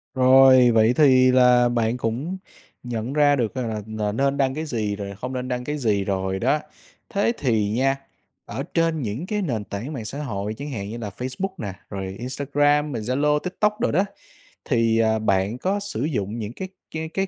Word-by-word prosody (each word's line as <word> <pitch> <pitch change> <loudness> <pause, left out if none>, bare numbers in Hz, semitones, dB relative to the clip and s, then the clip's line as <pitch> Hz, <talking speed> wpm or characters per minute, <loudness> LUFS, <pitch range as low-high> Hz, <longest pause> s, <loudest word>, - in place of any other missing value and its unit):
Rồi 130 -1 +7
vậy 115 +1 +4
thì 130 -3 +5
là 125 -1 +5
bạn 120 0 0
cũng 130 +11 -3 0.5
nhận 120 +1 -4
ra 145 -1 +4
được 120 -5 -1
rằng 125 -3 -2 0.3
là 105 -1 -1
n 110 - -6
nên 140 +1 +1
đăng 135 -1 +1
cái 155 +3 -4
gì, 110 -8 -2
rồi 100 -1 -6
không 125 +6 -6
nên 125 0 -3
đăng 125 -1 -2
cái 150 +4 -3
gì 105 -7 +1
rồi 95 -1 -2
đó. 135 +7 +2 0.5
Thế 200 +3 +1
thì 110 -7 +1
nha, 135 +5 +1 0.5
ở 135 - -5
trên 165 -2 +1
những 115 +7 -3
cái 210 +1 -2
nền 120 - -2
tảng 110 +9 -6
mạng 115 -5 -5
xã 140 - -5
hội 105 -5 -3
chẳng 145 +3 -6
hạn 100 -5 -5
như 115 - -6
là 110 -3 -5
Facebook 130 +10 -3
nè, 100 - -5 0.2
rồi 95 -1 -5
Instagram, 145 +3 +1
rồi 110 - -3
Zalo, 145 +5 +1
TikTok 210 +5 -1
đồ - - +1
đó, 190 +6 +2 0.6
thì, 115 -3 +2
ờ, 110 -1 +2
bạn 100 +1 +1
có 190 +9 -1
sử 200 - -4
dụng 115 -7 -2
những 110 +1 -5
cái 190 +8 -6 0.2
cái 160 0 -4
cái 195 +4 -1
125 Hz, 205 wpm, -23 LUFS, 110-145 Hz, 0.6 s, Rồi